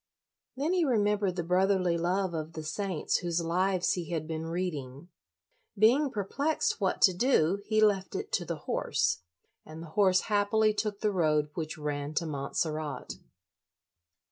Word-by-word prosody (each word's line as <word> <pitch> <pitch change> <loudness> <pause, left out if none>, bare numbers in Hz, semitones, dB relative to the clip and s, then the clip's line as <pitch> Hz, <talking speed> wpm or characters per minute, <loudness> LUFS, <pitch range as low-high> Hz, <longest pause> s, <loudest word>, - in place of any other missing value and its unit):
Then 300 +6 0
he 360 -2 +2
remem 210 -7 +2
bered 195 -3 -1
the 175 - -2
brotherly 185 0 +2
love 180 +2 0
of 160 0 -4
the 155 - -6
saints 180 +1 -1
whose 175 -1 -1
lives 180 +2 +1
he 170 -4 -4
had 160 -3 -3
been 160 0 -4
reading. 165 -4 -4 0.7
Being 250 +8 +4
perplexed 260 +6 -1
what 190 -2 0
to 185 - +7
do, 195 - +2
he 215 0 +2
left 200 -3 +2
it - - -4
to - - 0
the - - -4
horse, - - 0 0.4
and 155 +1 -10
the 165 - -10
horse 190 -3 +4
happily 215 +1 +2
took 210 -1 -3
the 210 - +2
road 155 -5 +1
which 155 -2 -5
ran 145 0 -4
to 170 - 0
Montserrat. 150 0 -3
180 Hz, 160 wpm, -29 LUFS, 160-205 Hz, 0.7 s, to